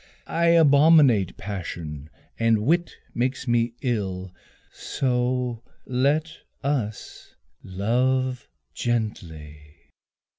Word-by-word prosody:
I 170 +1 +2
abominate 145 - +5
passion 80 -7 -6 0.3
and 115 -2 +2
wit 170 +5 +2 0.2
makes 130 +2 -2
me 120 0 +1
ill. 95 -7 -2 0.4
So 125 -2 -1 0.2
let 145 +6 0 0.2
us 125 -7 -4 0.3
love 125 +6 -1 0.2
gently. 85 -10 -4
120 Hz, 75 wpm, -24 LUFS, 100-135 Hz, 0.4 s, abominate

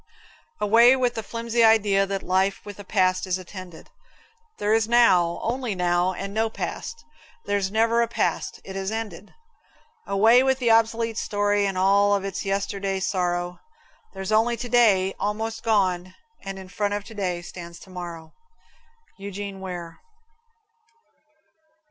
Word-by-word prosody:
Away 230 +5 +6
with 250 -2 0
the 225 - -4
flimsy 230 +1 -1
idea 205 -3 +4
that 195 0 -3
life 190 +2 0
with 205 -1 -9
a - - -7
past 185 -1 +1
is 185 0 0
attended. 185 -2 -11 0.7
There's 220 +1 +1
now 185 -8 +4
only 245 -2 -2
now 180 0 +1
and 195 +2 -6
no 220 +1 +1
past. 460 - -6 0.4
There's 200 -2 0
never 225 +3 +2
a 235 - +1
past; 235 - -2
it 190 - -9
has 195 0 -3
ended. 210 -4 -6 0.7
Away 220 +5 +5
with 265 0 +2
the 240 -3 +2
obsolete 225 0 +2
story 205 0 +1
and 195 -1 -3
all 200 +2 +4
of 195 -1 -2
its 195 -2 -4
yesterday 195 -1 -2
sorrow! 175 -2 -1 0.6
There's 190 +1 -5
only 230 +2 +3
Today, 225 -6 +3
almost 220 +2 -3
gone, 185 -4 0 0.3
and 195 0 -6
in 190 -1 -9
front 205 +1 -1
of 205 - -4
Today 190 -5 -4
stands 170 -1 -9
Tomorrow. 170 -3 -9 0.9
Eugene 200 0 -6
Ware. 175 -3 -7
200 Hz, 140 wpm, -24 LUFS, 185-225 Hz, 0.9 s, Away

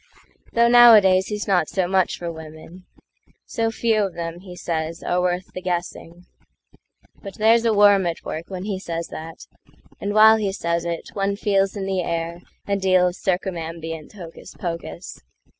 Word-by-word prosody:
Though 235 0 +4
nowadays 215 -6 +7
he's 210 -1 -4
not 180 -6 +2
so 185 -2 -1
much 190 0 +1
for 170 -1 -5
women:"So 165 +8 -8
few 225 -1 0
of 195 -3 -2
them," 170 0 -5
he 180 -1 -11
says, 165 -1 -4
"are 180 0 0
worth 180 0 -2
the 185 - -6
guessing."But 180 +2 -9
there's 225 +2 +3
a 225 - +3
worm 200 -2 +5
at 170 - -5
work 160 +2 -5
when 185 -1 -6
he 200 -2 -3
says 170 -2 -5
that, 160 +1 -9 0.5
And 205 +1 -3
while 220 +1 +7
he 200 -3 -2
says 170 -2 -2
it 170 -1 -4
one 200 0 -1
feels 195 -1 0
in 195 -2 -4
the 190 -1 -1
airA 170 0 -4 0.4
deal 185 -1 +3
of 175 - -9
circumambient 165 -4 -4
hocus 175 -5 -11
pocus. 165 - -6
185 Hz, 160 wpm, -22 LUFS, 170-200 Hz, 0.5 s, nowadays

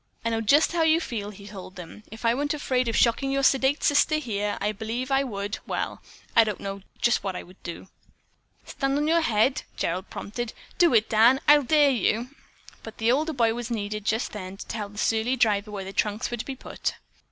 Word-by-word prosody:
"I 230 - +1
know 225 0 0
just 285 +8 +4
how 340 -1 0
you 320 0 +4
feel," 220 -10 -4
he 200 -1 -12
told 190 -2 -10
them. 180 +2 -10
"If 220 +1 -8
I 230 - +4
weren't 290 +4 -1
afraid 255 -4 0
of 230 - -1
shocking 245 +3 +3
your 275 0 0
sedate 270 +2 +3
sister 295 +1 +4
here, 210 -8 -2
I 205 +1 0
believe 225 +5 -4
I 270 0 +3
would 205 -4 -4
well - - -3 0.3
I 230 - +8
don't 210 -3 -3
know 195 0 -5 0.2
just 240 - +2
what 190 -2 -3
I - - -5
would 185 +2 -18
do." 170 +2 -8 0.8
"Stand 275 0 -1
on 295 +1 0
your 335 +1 +3
head," 240 -1 +2 0.2
Gerald 180 +3 -2
prompted. 220 +3 -5 0.3
"Do 340 -9 +5
it, 220 0 +4
Dan. 230 +4 +5
I'll 295 0 +8
dare 290 +1 +4
you." 240 0 0 0.5
But 225 - -10
the 225 +1 +2
older 305 +5 +1
boy 230 -4 +2
was 240 0 -5
needed 210 -2 -3
just 220 +2 0
then 190 -2 -7
to - - -8
tell 210 -2 -5
the 205 - -15
surly 225 +4 +1
driver 215 -4 +2
where 200 -2 -5
the 195 - -7
trunks 210 +3 -1
were 240 - -2
to 220 - -5
be 270 - -5
put. - - -4
230 Hz, 220 wpm, -26 LUFS, 210-270 Hz, 0.8 s, I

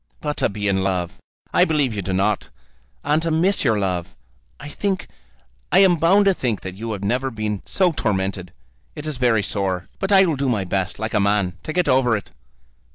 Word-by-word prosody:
"But 150 -1 -3
to - - +1
be 105 0 -3
in 95 -1 +1
love! 90 -3 -2 0.3
I - - +5
believe 145 -6 +1
you 100 - -3
do 95 +1 -4
not. 100 +2 0 0.5
And 150 +2 +1
to 165 - -1
miss 175 +5 +2
your 110 -6 +2
love! 90 -4 -2 0.4
I - - -8
think, 190 +5 -2 0.6
I - - +4
am 190 -3 +6
bound 190 +6 +4
to 195 - +5
think 120 - -2
that 95 - -6
you 110 +4 -6
have 100 -1 -6
never 125 +6 0
been 110 -4 -3
so 185 -2 +2
tormented. 95 - -2 0.4
It 150 - -6
is 155 -3 -3
very 120 -4 +2
sore; 95 -3 -2
but 195 +1 -2
I 195 -1 +7
will 160 -5 0
do 135 -1 0
my 110 -5 0
best, 95 0 -2
like 110 +2 -4
a - - +3
man, 100 -2 +1
to - - -5
get 180 +1 +1
over 130 -4 +3
it." 105 - -10
115 Hz, 215 wpm, -21 LUFS, 100-155 Hz, 0.6 s, I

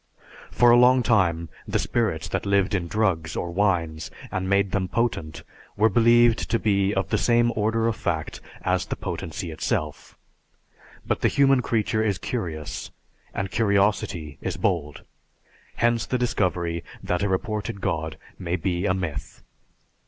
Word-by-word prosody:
For 120 -1 +5
a 120 - +7
long 125 +1 +5
time 85 -8 +2 0.2
the - - 0
spirits 95 -8 -1
that 90 - -2
lived 100 -1 +2
in 90 -4 -1
drugs 85 -6 0
or 85 - -3
wines 85 -5 0 0.2
and 95 0 -2
made 100 -1 +2
them 95 -2 0
potent 105 -9 -2 0.3
were 110 +2 +4
believed 120 +2 +4
to 115 - +2
be 100 -3 +1
of 95 -2 -1
the 110 - +1
same 120 0 +3
order 110 +2 +1
of 115 - 0
fact 80 -6 -3 0.2
as - - 0
the - - -3
potency 80 +1 -5
itself. 75 -1 -3 0.9
But - - -1
the - - +4
human 135 -2 +4
creature 110 -2 0
is 100 -4 0
curious 80 - -4 0.4
and 95 -1 -3
curiosity 100 - 0
is - - -3
bold. 80 -7 -1 0.7
Hence, 120 0 +1
the 130 - 0
discovery 85 -8 -1 0.2
that 90 0 -1
a 100 - +1
reported 100 +1 -2
god 80 -3 -2 0.2
may 90 -1 -2
be 90 +2 -1
a 95 - +2
myth. 80 -6 -5
100 Hz, 150 wpm, -24 LUFS, 85-110 Hz, 0.9 s, a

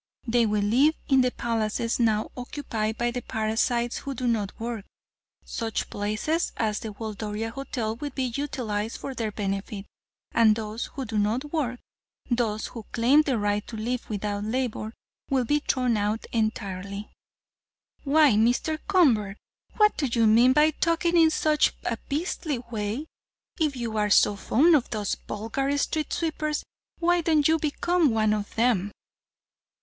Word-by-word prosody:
They 235 -1 +3
will 210 -1 +1
live 265 +10 +4
in 270 -2 +5
the 250 - +3
palaces 230 -1 -1
now 220 -2 +1
occupied 230 -4 -3
by 240 0 0
the 245 +1 -4
parasites 230 +2 0
who 275 -1 -5
do 250 - -3
no 225 -4 +1
work. 230 -2 -4 0.6
Such 225 -2 -3
places 215 - -1
as 215 -2 0
the 220 - -6
Waldoria 215 +1 -4
Hotel 235 -4 -3
will 290 +4 -4
be 265 -1 -3
utilized 230 -7 -3
for 275 - -6
their 225 -4 -3
benefit, 200 0 -4 0.5
and 220 -2 +5
those 220 +1 -4
who 270 -2 -6
do 220 -2 -1
not 240 +9 -1
work, 250 -6 -1 0.5
those 225 -3 0
who 230 -3 -8
claim 255 +6 +5
the 275 -5 0
right 205 0 -1
to 225 - -7
live 240 +3 -3
without 205 -1 -2
labor, 220 -1 -2 0.4
will 260 -2 +2
be 295 +5 +2
thrown 255 -5 +1
out 210 +2 -1
entirely." 200 -3 -3 0.9
"Why, 300 0 +5
Mr. 245 +8 +2
Convert, 235 - +3 0.4
what 425 -1 +4
do 285 - 0
you 235 -2 +2
mean 235 +4 +6
by 300 +2 +5
talking 335 +2 +1
in 325 -1 +6
such 305 -1 +2
a - - -1
beastly 300 -1 -2
way? 235 +2 -4 0.5
If 305 -4 +1
you 230 -3 -3
are 210 0 +1
so 205 0 +5
fond 300 - +4
of 270 - +1
those 210 -3 -2
vulgar 270 +7 -2
street 305 +1 -1
sweepers, 310 -2 -1 0.3
why 350 0 +2
don't 310 -3 +3
you 320 0 +3
become 320 +2 +1
one 215 -2 +2
of 210 -1 -4
them?" 220 -4 +2
235 Hz, 155 wpm, -26 LUFS, 215-285 Hz, 0.9 s, mean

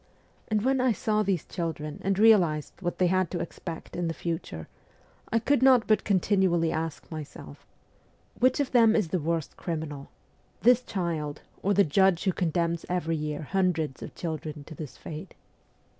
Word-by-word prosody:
And 215 -1 0
when 265 -1 +3
I 255 -2 +3
saw 215 +1 0
these 195 -5 0
children 155 -4 -4
and 195 0 +1
realized 185 -9 +4
what 175 -1 -2
they 185 - +3
had 185 -1 +2
to 175 - -3
expect 170 0 -7
in 175 -1 -1
the 165 - -3
future, 165 - -4 0.6
I 230 - +3
could 255 +3 +2
not 260 -3 +6
but 215 - +3
continually 185 -4 +2
ask 160 0 -4
myself: 145 - -9 0.4
' - - -30
Which 255 +3 +3
of 285 - 0
them 230 -3 +5
is 205 -7 +1
the 185 - 0
worst 165 0 -2
criminal 155 -4 -5 0.5
this 245 +1 +6
child 165 -9 -3 0.2
or 200 +1 +1
the 200 - +6
judge 190 +2 +3
who 190 -2 +1
condemns 170 -1 0
every 170 -2 0
year 150 0 -3
hundreds 165 -5 0
of - - -8
children 155 -3 -5
to 160 - -11
this 150 -2 -8
fate 160 +4 -8
175 Hz, 175 wpm, -27 LUFS, 160-200 Hz, 0.6 s, not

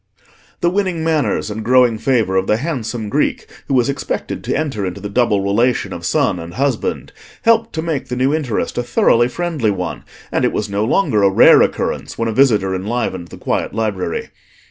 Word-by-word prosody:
The 170 - +3
winning 185 -4 -1
manners 150 -10 0
and 110 +1 -5
growing 125 -2 +4
favour 115 -6 +1
of 95 0 +1
the 105 - +2
handsome 120 -6 -3
Greek 105 - 0 0.2
who 135 - 0
was 125 -2 +3
expected 140 - -3
to - - -1
enter 140 -10 -2
into 95 +1 -4
the 100 +1 -6
double 110 -3 +2
relation 100 0 +1
of 85 0 -5
son 125 - +1
and 85 +1 -8
husband 135 -3 -2 0.3
helped 230 0 +3
to 160 - -3
make 160 -5 -2
the 125 - -3
new 130 +3 +1
interest 135 -7 -2
a - - +2
thoroughly 120 0 +3
friendly 155 -5 -1
one, 90 -3 -3 0.3
and - - 0
it - - +1
was 105 -1 -2
no 100 +1 0
longer 125 - +2
a 100 - +5
rare 95 - +7
occurrence - - -1
when 115 - -1
a - - 0
visitor 105 -7 +3
enlivened 95 -2 -3
the - - -11
quiet - - -2
library. 105 -6 -2
115 Hz, 195 wpm, -18 LUFS, 100-140 Hz, 0.3 s, rare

